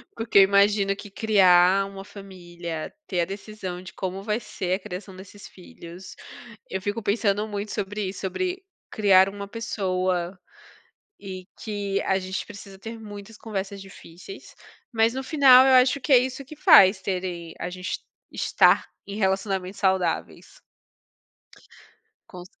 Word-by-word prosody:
Porque 225 -2 0
eu - - +9
imagino 200 0 +3
que 205 0 -11
criar 195 -2 +4
uma 195 0 -9
família, 175 -5 -8
ter 180 -3 0
a - - +1
decisão 195 -2 -7
de 185 - -11
como 190 +1 -5
vai 210 +2 -1
ser 190 -4 -4
a - - -6
criação 185 0 -8
desses 195 +2 -12
filhos, 180 0 -12 0.5
eu 190 - -4
fico 205 +3 -3
pensando 205 0 0
muito 205 0 -5
sobre 205 -1 -3
sobre 365 - -4 0.3
criar 195 -3 +5
uma 200 0 -8
pessoa 185 -5 -2 0.8
e 185 -2 -8 0.2
que 200 -2 -2
a 190 - +1
gente 185 0 -4
precisa 200 -1 -12
ter 225 +3 -8
muitas 210 0 -10
conversas 200 -2 -5
difíceis, 190 - -12 0.4
mas 225 +1 +2
no 265 - -3
final 265 -3 +7
eu 260 - +5
acho 255 +2 +4
que 280 - -1
é 255 - +9
isso 260 +2 -3
que 305 +4 -12
faz 200 - +7
terem 180 -3 -4
a 180 - -4
gente 180 0 -5 0.3
estar - - +3 0.2
em 200 +1 -7
relacionamentos 195 -1 -1
saudáveis. 190 -4 -1 1.7
Com 180 -2 -10
c - - -14
195 Hz, 145 wpm, -24 LUFS, 185-215 Hz, 1.7 s, eu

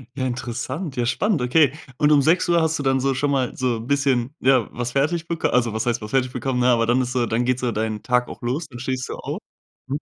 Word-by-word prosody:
Ja, 130 -2 -2
interessant, 130 +5 -4
ja, 120 - +1
spannend, 185 - +1
okay, 140 +3 +4 0.3
und 150 0 +3
um 145 -2 +6
6:00 170 +3 +3
hast 160 0 +1
du 145 - -4
dann 135 -1 +2
so 135 +1 +1
schon 140 +2 0
mal 130 -3 0
so 125 -2 0
'n 115 +1 -8
bisschen, 140 -2 +1
ja, 130 -3 +4
was 120 0 -3
fertig 155 +5 0
bek 165 -1 -3
also, 120 -2 +2
was 110 +1 -2
heißt 120 -1 0
was 105 0 -7
fertig 130 -2 +1
bekommen, 125 0 -2
ne, 125 - +3
aber 120 -2 +4
dann 120 +2 +2
ist 125 0 -3
so 125 -2 +1
dann 115 +2 0
geht 125 0 +1
so 125 -2 -1
deinen 110 -1 -3
Tag 125 -1 +1
auch - - -10
los, 135 +7 -2
dann 125 -4 -10
stehst 130 +1 -3
du - - -5
auf. - - -5 0.5
Mhm. 140 +3 -2
130 Hz, 260 wpm, -22 LUFS, 120-140 Hz, 0.5 s, um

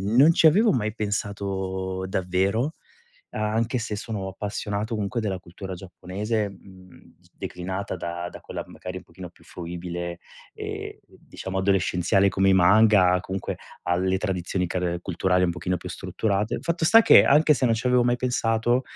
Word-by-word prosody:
non 145 +6 +7
ci 165 - +3
avevo 210 +8 +6
mai 110 -4 -1
pensato 95 -3 -3
davvero, 95 - 0 0.6
anche 110 +3 -1
se 115 -3 -3
sono 105 -2 -5
appassionato 105 +3 -3
comunque 105 +3 -2
della 100 -3 -2
cultura 95 +2 -8
giapponese, 100 +4 -3
mhmm, 95 -1 -17 0.2
declinata 95 +2 -5
da 85 0 -5
da - - -11
quella - - -6
magari 90 0 -8
un - - -9
pochino 90 -2 -10
più - - -23
fruibile 85 0 -6 0.4
e - - -6
diciamo 95 0 -7
adolescenziale 95 0 +2
come 95 0 +2
i - - +5
manga, 95 0 +5
comunque 95 0 -4 0.3
alle 95 +2 +1
tradizioni 90 -2 -2
car 90 -1 -1
culturali 90 0 +1
un 85 - +2
pochino 90 +1 -2
più - - -9
strutturate. 105 0 -2
Fatto 170 0 -2
sta 225 +6 +8
che - - +8
anche 150 +2 +5
se 130 -2 0
non 115 - +3
ci 115 +3 -5
avevo 125 -1 +4
mai 120 0 +2
pensato, 120 -1 +1
95 Hz, 155 wpm, -25 LUFS, 90-115 Hz, 0.6 s, sta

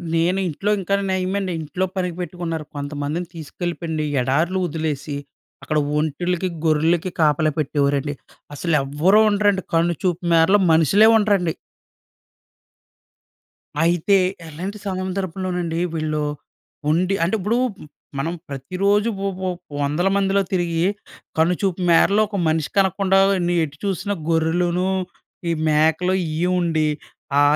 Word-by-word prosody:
నేను 175 +4 +2
ఇంట్లో 195 +6 -1
ఇంకా 195 +1 0 0.2
నయమండి, 190 +1 -1
ఇంట్లో 170 +5 -2
పనికి 180 -3 -2
పెట్టుకున్నారు. 170 -3 -4
కొంతమందిని 145 +4 -3
తీసుకెళ్ళిపెండి 165 0 -4 0.2
ఎడారు‌లో 160 +9 +1
వదిలేసి, 150 -3 -3 0.5
అక్కడ 155 - -1 0.2
ఒంటెలకి, 175 +4 -1 0.2
గొర్రెలకి 160 +3 +2
కాపలా 155 0 +3
పెట్టేవారండి. 145 0 0 0.4
అసలెవరూ 150 +5 +2
ఉండరండి 205 -2 +2
కన్నుచూపు 170 +1 +1
మేరలో 165 +5 +5
మనుషులే 165 +7 +5
ఉండరండి. 200 -6 +2 2.3
అయితే, 175 +4 +3 0.3
అలాంటి 185 +7 -6
సందర్భంలోనండి 185 -2 -2
వీళ్ళు 155 -1 -1 0.7
ఉండి 180 +4 +2
అంటే 185 - 0
ఇప్పుడు 210 +5 0 0.6
మనం 160 +5 -1 0.2
ప్రతిరోజూ 190 - 0
వొ 200 - 0
వొ 185 - -1 0.3
వందల 150 +6 +1
మందిలో 200 0 +2
తిరిగి, 170 -2 0 0.5
కన్నుచూపు 180 +3 +1
మేరలో 200 +5 +5
ఒక 205 - -4
మనిషి 155 -3 0
కనకుండా, 195 0 +3 0.3
నీ 175 - +1
ఎటు 145 -1 -9
చూసిన 200 +1 -1 0.2
గొర్రెలును, 170 +3 +1 0.6
ఈ - - +2 0.2
మేకలు 160 +4 +2
ఇయే 160 +3 0
ఉండి, 160 -3 +1 0.5
ఆ - - +6
170 Hz, 110 wpm, -21 LUFS, 155-190 Hz, 2.3 s, ఆ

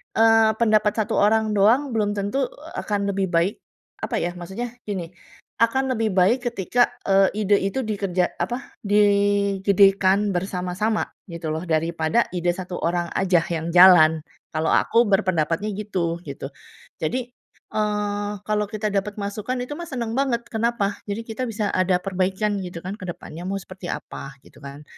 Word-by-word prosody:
eee, 225 -1 +5
pendapat 215 -2 +3
satu 210 - -2
orang 215 +1 +3
doang, 235 +8 +4
belum 210 -2 +1
tentu 205 +7 -1 0.3
akan 200 -1 -1
lebih 195 -1 -1
baik, 170 +5 +2 0.5
apa - - -1
ya, 175 - -1
maksudnya 190 +8 -5 0.2
gini, 180 -5 -4 0.5
akan 265 +3 +1
lebih 220 -1 0
baik 190 +7 +4
ketika, 235 +3 +1 0.2
eee, 195 0 +5
ide 205 0 +4
itu 195 +7 -2
dikerja 195 -5 -1
apa, 240 +10 -4
digedekan 200 -1 +3
bersama-sama, 185 +4 -1 0.2
gitu 170 -3 -5
loh, 160 - -3
daripada 165 +6 +1
ide 175 0 +1
satu 180 0 -6
orang 175 0 0
aja 180 -3 +3
yang 165 0 -2
jalan. 175 -3 +7 0.3
Kalau 155 +1 0
aku 235 0 +3
berpendapatnya 185 0 +1
gitu, 185 -5 -2
gitu. 140 0 -6 0.5
Jadi, 245 +10 -2 0.4
eee, 205 -1 -1
kalau 210 0 0
kita 215 0 -3
dapat 200 +1 -1
masukan, 205 +5 -3
itu 250 - -9
mah 345 - -6
seneng 240 -6 -4
banget, 255 -4 +1
kenapa, 220 -3 -1
jadi 205 +2 -3
kita 225 +3 -4
bisa 215 -2 -2
ada 185 0 +2
perbaikan, 195 +2 -1
gitu 175 -3 -7
kan, 190 +3 -5
ke 185 - -7
depannya 175 0 -7
mau 195 - -2
seperti 185 0 -10
apa, 135 0 -8
gitu - - -18
kan. 140 +1 -10
200 Hz, 155 wpm, -23 LUFS, 180-215 Hz, 0.5 s, jalan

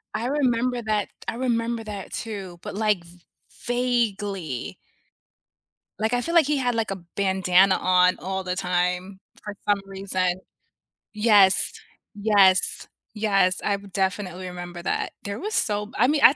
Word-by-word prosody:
I 230 +3 -1
remember 250 -3 +1
that 215 -2 -1
t - - -34
I - - -2
remember 235 -2 -1
that, 205 -3 -7
too, 195 -6 -6
but, - - -6
like, 210 -4 +1
v 175 +1 -17 0.5
vaguely. 205 - -1 1.2
Like, 220 +3 0
I 245 - +2
feel 335 +4 -3
like 325 -4 +6
he 300 -1 +1
had, 245 -3 0
like, 225 -3 -1
a 195 - -3 0.2
bandana 190 -1 +3
on 180 0 +3
all 190 +1 -3
the 180 0 -3
time 180 +2 -1 0.2
for 210 - -6
some 205 -1 +3
reason. 185 -2 -2 0.7
Yes. 210 -3 +5 0.4
Yes. 200 -3 +3 0.3
Yes, 195 -4 +2
I 205 - +1
would 200 -1 -11
definitely 185 -1 -2
remember 175 -1 -7
that. - - -1
There 200 0 -5
was 425 +3 -3
so 210 -1 0
I 240 - +4
mean, 295 +1 +1
I 275 - +8
200 Hz, 155 wpm, -24 LUFS, 185-230 Hz, 1.2 s, I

